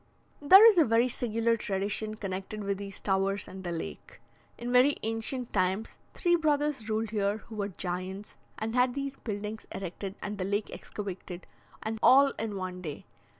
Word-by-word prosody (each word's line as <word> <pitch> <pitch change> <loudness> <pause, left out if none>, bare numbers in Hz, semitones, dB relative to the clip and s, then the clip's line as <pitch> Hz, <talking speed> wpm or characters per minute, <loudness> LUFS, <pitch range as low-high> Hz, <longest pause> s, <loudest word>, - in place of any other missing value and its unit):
There 380 +9 +9
is 415 -6 +6
a - - +8
very 230 -1 +3
singular 230 -1 0
tradition 210 +1 -2
connected 195 +1 -5
with 200 0 -2
these 200 -1 -7
towers 195 0 0
and 190 0 -9
the 175 - -3
lake. 165 - -7 0.4
"In 240 +1 -4
very 255 +3 +5
ancient 225 +3 -2
times 190 +3 0 0.2
three 345 -1 +3
brothers 295 -7 0
ruled 220 0 -1
here, 205 -1 0
who 220 +1 -12
were 200 -1 -1
giants, 185 +2 -5 0.2
and 220 +1 -3
had 250 0 +2
these 275 -1 -4
buildings 210 0 -5
erected 195 +1 -5
and 205 0 -5
the - - 0
lake 205 +2 -1
excavated, 190 -3 -7 0.4
and 220 0 -3
all 275 +2 +7
in 220 -2 -3
one 185 -1 -5
day. 155 -5 -7
215 Hz, 170 wpm, -29 LUFS, 195-240 Hz, 0.4 s, There